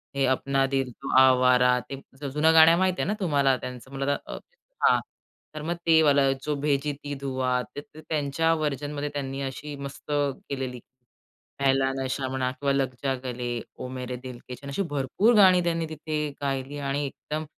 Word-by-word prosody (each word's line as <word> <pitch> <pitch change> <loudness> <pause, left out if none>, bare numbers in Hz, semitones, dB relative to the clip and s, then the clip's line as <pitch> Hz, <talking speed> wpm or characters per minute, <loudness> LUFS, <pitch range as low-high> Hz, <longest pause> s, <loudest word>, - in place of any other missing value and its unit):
हे 135 -1 +2
अपना 135 +1 +1
दिल 135 -2 -1
तो - - -9
आवारा, 125 -1 +5
ते 135 0 -6 0.2
ज - - -5
जुनं 155 +2 +4
गाणं 160 +1 +8
माहिती 185 -1 +1
आहे - - -1
ना 210 - +1
तुम्हाला 140 -7 +2
त्याचं? 125 0 -8
म्हणलं 140 +1 0
तर - - -6 0.5
हां, - - +5 0.6
तर 155 - -5
मग 170 +2 -1
ते 160 -1 +6
वाला 140 -2 +4
जो 150 -1 -1
भेजी 145 0 0
थी 145 0 -4
दुआ 130 -2 0
ते 145 - -4
त 150 - -21
त्यांच्या 155 +2 +1
व्हर्जनमध्ये 145 -1 -2
त्यांनी 135 -1 -4
अशी 140 +2 -5
मस्त 140 +1 -8
केलेली. 135 -3 -2 0.8
पहला 135 -1 +3
नशा 130 0 -2
म्हणा 130 -1 -1
किंवा 140 +2 -1
लग 135 -2 0
जा 135 -1 +1
गले, 120 -1 -3 0.2
ओ 130 - -6
मेरे 125 -1 -5
दिल 125 -1 -9
के 125 - -5
चैन, 140 +2 -9
अशी 140 +8 -1
भरपूर 145 - +2
गाणी 185 -3 +7
त्यांनी 165 -1 0
तिथे 155 -1 -3
गायली 135 +1 -2
आणि 140 0 -1
एकदम 155 +3 -5
140 Hz, 180 wpm, -26 LUFS, 130-150 Hz, 0.8 s, गाणं